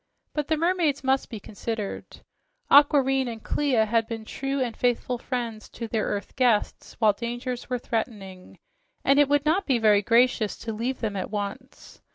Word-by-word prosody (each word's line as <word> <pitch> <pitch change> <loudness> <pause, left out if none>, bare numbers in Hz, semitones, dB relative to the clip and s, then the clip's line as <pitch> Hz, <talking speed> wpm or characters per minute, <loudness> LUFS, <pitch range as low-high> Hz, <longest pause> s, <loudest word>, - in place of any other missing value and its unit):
But 300 -1 -2
the 315 - +1
mermaids 330 -4 +1
must 265 0 +1
be 220 - -6
considered. 215 +1 -6 0.5
Aquareine 270 -2 +5
and 225 -2 -7
Clia 260 -7 +1
had 225 +1 +1
been 225 -1 -6
true 275 +4 -3
and 245 -3 -2
faithful 245 0 0
friends 235 -4 -4
to 230 - -4
their 220 -1 -1
earth 200 0 -4
guests 245 -5 0
while 215 -3 +4
dangers 240 +3 -5
were 250 - 0
threatening, 205 -6 -5 0.5
and 275 +1 +5
it 290 -1 +4
would 290 0 +2
not 340 +6 +1
be 265 -4 +3
very 210 -3 +4
gracious 230 -1 +2
to 225 -1 -5
leave 240 +5 -3
them 215 -3 -2
at 190 - -3
once. 210 +5 -7
240 Hz, 175 wpm, -25 LUFS, 220-270 Hz, 0.5 s, Aquareine